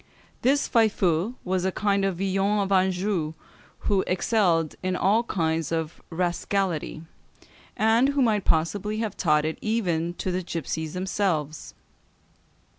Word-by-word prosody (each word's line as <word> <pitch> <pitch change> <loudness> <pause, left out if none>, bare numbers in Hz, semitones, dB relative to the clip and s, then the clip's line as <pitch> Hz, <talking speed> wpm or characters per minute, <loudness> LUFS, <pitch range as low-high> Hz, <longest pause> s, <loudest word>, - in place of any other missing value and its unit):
This 280 +3 +2
Faifeu 205 -2 +2
was 185 -1 -1
a 190 - +1
kind 200 0 +1
of 195 -3 0
Villon 195 +2 +1
of 195 0 -2
Anjou, 185 -3 +1 0.5
who 195 -2 +1
excelled 180 -5 +2
in 185 0 -1
all 205 +5 +3
kinds 165 -5 -1
of 160 -1 -3
rascality, 175 -1 -1 0.7
and 225 +5 +4
who 285 -1 +1
might 215 -4 +2
possibly 200 +6 0
have 220 -3 -2
taught 150 -3 +2
it 155 - -3
even 175 -7 -1
to 185 - -3
the 180 +1 -1
gipsies 160 -2 -4
themselves. 180 -5 -2
185 Hz, 130 wpm, -25 LUFS, 165-205 Hz, 0.7 s, and